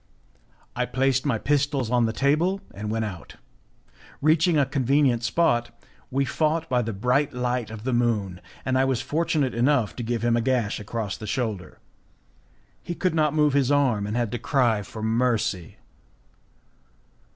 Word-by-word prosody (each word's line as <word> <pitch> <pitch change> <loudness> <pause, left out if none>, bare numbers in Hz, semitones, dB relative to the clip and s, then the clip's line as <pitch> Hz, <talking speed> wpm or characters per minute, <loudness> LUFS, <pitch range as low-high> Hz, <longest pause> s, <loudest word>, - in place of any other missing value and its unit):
I - - -1
placed 135 +1 +1
my 125 -5 +1
pistols 140 -2 0
on 120 -2 +3
the - - -1
table, 155 - +1
and 105 +1 -6
we 105 - -2
went 115 0 -1
out. 95 -5 -8 0.8
Reaching 160 +3 +3
a 140 - +4
convenient 135 -2 +2
spot, 120 -5 +1 0.4
we 135 +1 0
fought 160 +3 0
by 125 -3 +1
the 115 -1 -3
bright 125 +8 0
light 125 -2 -1
of 110 -1 -8
the 130 +1 -1
moon, 105 -7 0 0.2
and 130 0 +1
I - - +4
was 135 -3 +1
fortunate 150 -4 0
enough 125 -2 +1
to - - -3
give 115 -1 -2
him 120 0 +2
a 120 - +1
gash 120 -4 0
across 105 -1 -4
the 110 - -8
shoulder. 110 -6 -3 1.0
He 175 - -5
could 185 -1 0
not 155 -2 +1
move 150 -2 +3
his 140 -1 +2
arm, 125 -8 +2
and 105 - -3
he - - +1
had 120 -3 -1
to 120 - -3
cry 120 -7 +1
for 110 +3 -8
mercy. 110 -6 0
125 Hz, 175 wpm, -25 LUFS, 110-140 Hz, 1.0 s, a